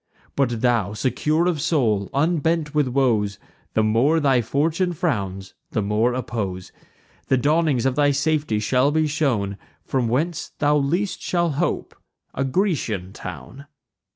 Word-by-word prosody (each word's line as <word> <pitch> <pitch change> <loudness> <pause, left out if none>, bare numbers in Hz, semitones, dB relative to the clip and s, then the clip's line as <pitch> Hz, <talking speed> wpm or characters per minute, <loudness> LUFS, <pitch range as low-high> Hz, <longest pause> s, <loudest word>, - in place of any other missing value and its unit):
But 120 -5 0
thou, 115 -5 +1
secure 150 +8 0
of 170 -5 0
soul, 110 - +1
unbent 160 +1 0
with 150 -3 +2
woes, 115 -6 +1 0.4
The 110 - +3
more 120 +9 +3
thy 135 -5 +3
fortune 160 - 0
frowns, 95 - -2 0.2
the 110 - +1
more 110 +4 +1
oppose. 100 -7 -4 0.6
The 130 - +3
dawnings 145 -2 +2
of 130 -1 +1
thy 145 0 +3
safety 145 -4 0
shall 125 +6 +2
be 155 +1 +2
shown 125 -10 -1 0.3
From 130 -3 0
whence 150 +8 -1
thou 145 0 +2
least 170 +7 -1
shalt 170 -3 0
hope, 170 +6 -2 0.4
a 135 - -1
Grecian 130 - -1
town." 140 +1 -9
135 Hz, 140 wpm, -22 LUFS, 110-155 Hz, 0.6 s, The